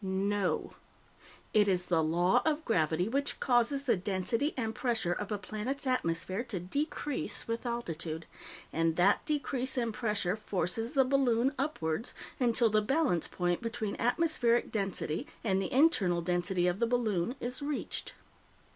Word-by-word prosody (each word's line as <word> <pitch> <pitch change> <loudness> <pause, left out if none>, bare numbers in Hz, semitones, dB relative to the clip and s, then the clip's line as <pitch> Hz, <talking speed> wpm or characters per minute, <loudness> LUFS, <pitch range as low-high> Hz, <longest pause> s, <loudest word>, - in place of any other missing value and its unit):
No. 195 0 0 0.8
It 210 -1 +5
is 180 -2 +1
the 165 -3 +2
Law 175 +4 +3
of 315 0 0
Gravity 165 -3 +1
which 280 +5 -1
causes 250 +2 +2
the 255 - +3
density 200 - -1
and 225 -3 -1
pressure 225 -8 0
of 205 +3 -5
a 210 - 0
planet's 215 +8 -4
atmosphere 190 -4 0
to 220 -6 -3
decrease 285 - -3
with 230 +2 -3
altitude, 165 -9 -4 0.5
and 165 0 +1
that 180 +4 +4
decrease 270 -4 -1
in 235 -2 0
pressure 210 -5 -1
forces 215 - -2
the 270 -3 +4
balloon 260 -1 +2
upwards 230 - -2 0.2
until 235 -2 +3
the 215 0 +4
balance 255 - +1
point 175 -1 -1
between 230 -3 -3
atmospheric 245 -2 +2
density 195 - -2 0.2
and 195 -3 +1
the 190 - -3
internal 215 - +3
density 175 +1 0
of 180 +2 +1
the 235 - +2
balloon 230 -3 0
is 250 +4 -2
reached. 290 0 -3
220 Hz, 145 wpm, -31 LUFS, 180-255 Hz, 0.8 s, It